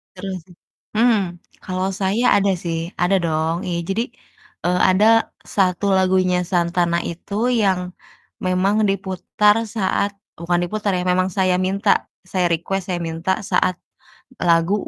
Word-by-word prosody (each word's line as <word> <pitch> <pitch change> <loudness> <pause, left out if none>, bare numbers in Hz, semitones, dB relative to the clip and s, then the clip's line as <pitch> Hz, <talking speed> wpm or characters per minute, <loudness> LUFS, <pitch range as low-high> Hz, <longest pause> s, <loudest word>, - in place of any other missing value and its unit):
terus 190 0 -5 0.6
hmm. 230 +1 +4 0.5
Kalau 185 +1 -2
saya 195 +5 +1
ada 200 0 +3
sih 165 -2 -2 0.2
ada 180 +2 +3
dong, 160 0 0
iya 175 -1 -1
jadi, 210 +4 0 0.6
eee, 180 +1 +2
ada 185 +3 +4 0.5
satu 185 -1 +2
lagunya 185 -1 +2
Santana 170 -1 +1
itu 175 +4 -9 0.3
yang 190 -3 +2 0.7
memang 185 +2 +2
diputar 195 +2 +1 0.2
saat 200 -1 0 0.3
bukan 175 +1 0
diputar 205 +3 -2
ya, - - -1
memang 185 +1 +1
saya 185 -1 +3
minta, 190 +2 0 0.4
saya 185 -2 +1
request, 190 +4 -2
saya 175 - -2
minta 165 +3 -2 0.2
saat 185 - +2 0.7
lagu, 165 +2 +3
185 Hz, 130 wpm, -21 LUFS, 175-195 Hz, 0.7 s, hmm